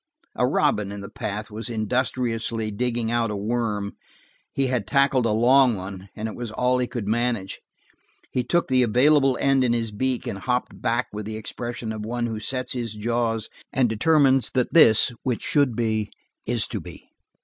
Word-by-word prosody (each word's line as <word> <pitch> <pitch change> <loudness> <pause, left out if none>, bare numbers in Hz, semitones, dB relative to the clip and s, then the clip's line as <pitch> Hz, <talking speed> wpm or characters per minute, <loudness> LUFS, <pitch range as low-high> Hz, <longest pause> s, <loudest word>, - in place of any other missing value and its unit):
A 125 - +2
robin 105 -5 +1
in 100 0 -6
the 100 - -9
path 105 +2 -5
was 110 +3 -5
industriously 115 -1 -1
digging 120 +1 -1
out 120 -1 +1
a 105 - -3
worm; 105 -1 -2 0.6
he 135 - 0
had 125 -6 -1
tackled 135 0 +3
a - - +1
long 125 +2 +5
one, 95 0 -8
and 110 +1 -4
it 110 - -6
was 120 -2 -5
all 125 +3 +1
he 125 - 0
could 115 -5 -5
manage. 115 -3 -1 0.7
He 125 - 0
took 170 +8 +1
the 130 -1 +3
available 135 +3 +4
end 135 -1 +3
in 120 -2 +2
his 115 -2 -1
beak 130 +4 -1
and 100 - -4
hopped 125 +3 -2
back 120 +2 0
with 105 0 -5
the 110 0 -4
expression 120 +1 -5
of 110 -1 -5
one 120 +2 -2
who 110 -2 -3
sets 130 +3 -3
his 115 -4 -3
jaws 115 0 -1 0.2
and 130 -2 +2
determines 135 +3 +3
that 125 -1 +1
this 115 -8 +6
which 125 -4 -2
should 140 -5 +2
be, 110 -2 -1 0.4
is - - +1
to - - -3
be. - - -12
120 Hz, 185 wpm, -24 LUFS, 110-125 Hz, 0.7 s, this